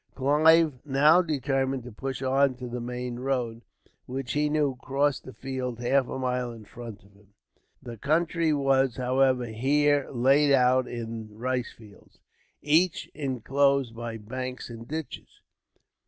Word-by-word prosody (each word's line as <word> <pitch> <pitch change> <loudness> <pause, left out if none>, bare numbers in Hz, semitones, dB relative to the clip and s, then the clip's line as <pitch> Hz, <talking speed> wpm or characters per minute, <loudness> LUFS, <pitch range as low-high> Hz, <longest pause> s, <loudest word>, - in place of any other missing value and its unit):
Clive 150 +1 +4
now 150 +5 +5
determined 135 -5 -1
to 125 - -9
push 135 +4 -5
on 135 0 +2
to 125 0 -7
the 120 0 -5
main 125 0 -5
road, 125 -3 -2 0.5
which 130 0 -4
he 150 0 +1
knew 150 -3 +1
crossed 140 +1 0
the 130 - -8
fields 130 -3 -5
half 130 +2 +2
a - - -5
mile 125 -1 -2
in 115 -2 -11
front 115 -1 -10
of 100 0 -22
him. 100 0 -25 0.5
The 120 -2 -8
country 165 +5 +1
was, 135 -3 +2
however, 130 0 +2
here 140 +5 +1
laid 140 +3 +3
out 130 -1 +4
in 115 -2 -7
rice 125 +1 -2
fields, 105 -3 -18 0.5
each 165 +4 +2
inclosed 135 -2 0
by 115 -1 -5
banks 125 +3 -6
and 115 0 -9
ditches. 155 -3 -7
130 Hz, 145 wpm, -27 LUFS, 120-140 Hz, 0.5 s, now